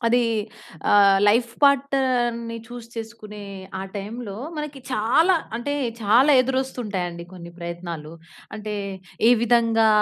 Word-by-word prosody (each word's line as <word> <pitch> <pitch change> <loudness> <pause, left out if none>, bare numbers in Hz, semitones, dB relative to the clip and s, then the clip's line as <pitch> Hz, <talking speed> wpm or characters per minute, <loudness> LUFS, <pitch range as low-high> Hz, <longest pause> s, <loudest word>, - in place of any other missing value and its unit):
అది 245 +1 +4 0.7
ఆహ్, 200 -1 +6
లైఫ్ 235 +3 +3
పార్ట్నర్‌న్ని 255 -4 +2
చూస్ 240 -1 -9
చేసుకునే 215 -2 -8 0.3
ఆ - - -4
టైమ్‌లో 210 +1 -6 0.2
మనకి 300 -2 -5
చాలా 255 - +3 0.2
అంటే 240 +5 -3 0.3
చాలా 240 +8 +5
ఎదురస్తు 265 +1 -1
ఉంటాయండి 175 -4 -4
కొన్ని 170 -2 -10
ప్రయత్నాలు. 170 -2 -6 0.4
అంటే 210 0 -5 0.5
ఏ - - +7
విధంగా, 230 -2 +4
230 Hz, 115 wpm, -23 LUFS, 200-250 Hz, 0.7 s, ఏ